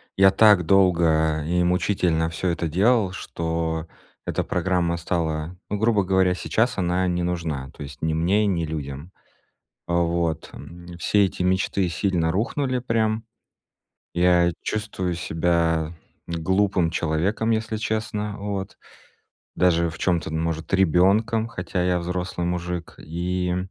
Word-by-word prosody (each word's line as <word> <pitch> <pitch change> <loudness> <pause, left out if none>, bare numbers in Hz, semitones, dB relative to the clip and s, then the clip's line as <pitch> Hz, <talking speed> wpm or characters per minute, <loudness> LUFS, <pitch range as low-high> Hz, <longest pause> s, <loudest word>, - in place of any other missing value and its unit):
я 95 0 +6
так 105 -4 +5
долго 80 -4 +3
и 90 +2 +1
мучительно 90 -2 +1
всё 80 +3 -2
это 85 0 -1
делал, 100 +4 +2
что 80 -2 -3 0.4
эта - - -1
программа 90 -3 0
стала, 80 -1 -2
ну 105 - -1
грубо 110 -1 +2
говоря, 95 -1 +3
сейчас 115 +6 0
она 90 0 +1
не 90 0 0
нужна, 80 -6 -3
то - - -9
есть 70 0 -10
ни 80 0 0
мне, 90 +7 +2
ни 90 -5 0
людям. 75 +1 -6 0.8
А, 85 - -2
вот, 85 -2 -1
м. 85 0 -11
Все 100 +4 +3
эти 90 - -3
мечты 95 +1 +1
сильно 85 -1 0
рухнули 125 - -1
прям. 110 -2 0 0.9
Я 85 0 +4
чувствую 100 -4 -2
себя 80 -1 0 0.3
глупым 90 +1 +1
человеком, 85 +7 0
если 110 0 0
честно. 105 -1 -2
Вот. 100 -1 -5 0.8
Даже 85 -2 +3
в 80 - -11
чём-то, 85 -4 0
м 80 - -2
может, 80 -1 -3
ребёнком, 100 +6 +3
хотя 90 -3 -3
я 90 0 +1
взрослый 90 0 -3
мужик. 90 -1 -3
И 90 +2 -2
90 Hz, 135 wpm, -24 LUFS, 85-100 Hz, 0.9 s, я